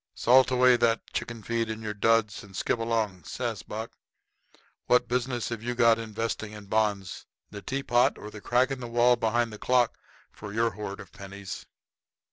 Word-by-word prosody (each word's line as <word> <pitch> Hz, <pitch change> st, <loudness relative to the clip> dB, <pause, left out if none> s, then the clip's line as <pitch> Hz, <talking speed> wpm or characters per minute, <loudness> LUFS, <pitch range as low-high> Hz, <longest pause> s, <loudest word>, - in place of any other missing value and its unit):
"Salt 130 Hz, +2 st, +5 dB
away 125 Hz, 0 st, +5 dB
that 115 Hz, -1 st, 0 dB
chicken 115 Hz, -2 st, -4 dB
feed 115 Hz, +1 st, -1 dB
in 110 Hz, 0 st, -4 dB
your 105 Hz, -1 st, -3 dB
duds, 110 Hz, 0 st, +2 dB
and 100 Hz, -2 st, -14 dB
skip 115 Hz, -, 0 dB
along," 110 Hz, -6 st, -1 dB
says 115 Hz, -2 st, -4 dB
Buck. 110 Hz, +2 st, -6 dB, 1.0 s
"What 125 Hz, 0 st, +4 dB
business 125 Hz, -1 st, -1 dB
have 115 Hz, -2 st, -4 dB
you 120 Hz, +1 st, -3 dB
got 115 Hz, -1 st, +5 dB
investing 110 Hz, -1 st, -4 dB
in 105 Hz, -1 st, -10 dB
bonds? 100 Hz, -2 st, -1 dB, 0.2 s
The 100 Hz, -, -8 dB
tea 135 Hz, +6 st, -3 dB
pot 120 Hz, -1 st, +3 dB
or 105 Hz, -, -9 dB
the 105 Hz, -, -10 dB
crack 125 Hz, +4 st, +2 dB
in 135 Hz, -, -3 dB
the 120 Hz, -, -6 dB
wall 120 Hz, +1 st, +4 dB
behind 115 Hz, 0 st, 0 dB
the 105 Hz, -, -9 dB
clock 125 Hz, -2 st, +2 dB, 0.3 s
for 105 Hz, -1 st, -9 dB
your 115 Hz, +2 st, +1 dB
hoard 100 Hz, -1 st, -6 dB
of 95 Hz, -, -11 dB
pennies." 100 Hz, -1 st, -8 dB
115 Hz, 185 wpm, -27 LUFS, 105-120 Hz, 1.0 s, Salt